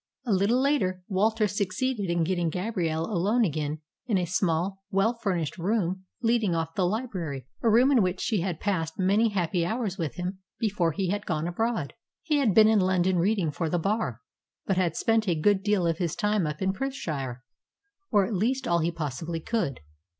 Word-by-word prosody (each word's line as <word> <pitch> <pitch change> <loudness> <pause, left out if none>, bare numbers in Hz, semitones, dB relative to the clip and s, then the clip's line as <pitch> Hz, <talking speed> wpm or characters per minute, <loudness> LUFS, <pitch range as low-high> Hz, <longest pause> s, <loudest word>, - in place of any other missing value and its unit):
A 230 - +1
little 200 +6 +3
later 220 -10 +1
Walter 215 +3 +2
succeeded 205 +2 -1
in 170 -1 +1
getting 175 0 0
Gabrielle 170 -3 -1
alone 210 +5 +2
again 155 -2 -2 0.3
in 215 -5 +2
a 180 - 0
small, 185 +2 0
well 200 +3 +2
furnished 185 -8 -2
room 190 -1 -1 0.2
leading 225 -6 +2
off 165 0 -2
the 185 0 +1
library 180 - -3 0.2
a 230 - +3
room 245 +5 +5
in 255 -5 +5
which 185 -1 0
she 215 -6 0
had 175 -3 -2
passed 165 -6 -1
many 200 +4 +3
happy 180 -3 0
hours 210 0 -2
with 160 -4 -2
him 185 +1 -4 0.2
before 195 -7 +1
he 190 +3 -2
had 205 +1 -3
gone 155 -1 -1
abroad. 220 -3 -1 0.3
He 305 -2 +1
had 240 -9 +2
been 215 -1 +8
in 220 -1 +4
London 185 -1 +2
reading 185 -3 +1
for 160 +2 -2
the 175 - +1
Bar, 170 - -1 0.4
but 195 - +1
had 175 -3 +1
spent 225 -1 +1
a 175 - +2
good 200 +4 +3
deal 205 -3 +1
of 165 -1 0
his 170 -4 -1
time 205 -5 +1
up 150 +4 -4
in 190 0 +1
Perthshire, 150 - -4 0.7
or 205 -4 +4
at 220 - -4
least 250 +7 0
all 170 -4 +3
he 165 +1 +1
possibly 165 +1 -4
could. 165 - -2
190 Hz, 195 wpm, -27 LUFS, 170-215 Hz, 0.7 s, been